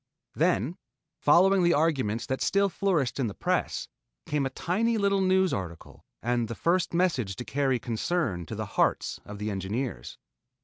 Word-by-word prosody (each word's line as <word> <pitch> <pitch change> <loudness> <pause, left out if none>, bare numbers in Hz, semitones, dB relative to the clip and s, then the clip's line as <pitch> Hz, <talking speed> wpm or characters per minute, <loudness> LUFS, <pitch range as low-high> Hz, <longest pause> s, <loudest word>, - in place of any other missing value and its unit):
Then 130 - +1 0.4
following 185 +5 +5
the 175 -1 +4
arguments 135 -8 +1
that 130 - -3
still 200 0 +2
flourished 170 -10 0
in 130 - +1
the 100 - -6
press, - - -1 0.4
came 145 -2 0
a - - -5
tiny 220 - 0
little 200 -1 +2
news 190 0 +3
article 85 -4 -6 0.2
and 120 0 0
the 115 - -5
first 175 +5 +1
message 160 - +1
to 125 - -6
carry 135 -2 +1
concern 115 - -2
to - - -5
the - - -3
hearts - - 0
of 105 - -8
the 105 +1 -3
engineers. 100 - -4
135 Hz, 165 wpm, -28 LUFS, 110-180 Hz, 0.4 s, following